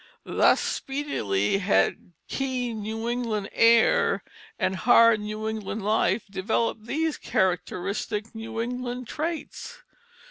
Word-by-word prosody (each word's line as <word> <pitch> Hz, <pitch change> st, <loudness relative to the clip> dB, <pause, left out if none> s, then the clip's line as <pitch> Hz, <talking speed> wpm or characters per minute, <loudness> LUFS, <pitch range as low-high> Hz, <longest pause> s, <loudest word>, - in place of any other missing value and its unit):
Thus -, -, +4 dB
speedily 195 Hz, -, -1 dB
had 185 Hz, -2 st, +1 dB
keen 250 Hz, -4 st, -2 dB
New 220 Hz, +2 st, -4 dB
England 230 Hz, -4 st, -2 dB
air 230 Hz, 0 st, +4 dB, 0.3 s
and 190 Hz, -, 0 dB
hard 230 Hz, 0 st, +6 dB
New 215 Hz, +1 st, -4 dB
England 220 Hz, -1 st, -4 dB
life 215 Hz, +2 st, +2 dB
developed 215 Hz, +3 st, -1 dB
these 315 Hz, +3 st, -1 dB
characteristic 195 Hz, +3 st, -1 dB
New 225 Hz, 0 st, -6 dB
England 245 Hz, +1 st, -4 dB
traits. 320 Hz, +4 st, -5 dB
225 Hz, 105 wpm, -26 LUFS, 210-245 Hz, 0.3 s, hard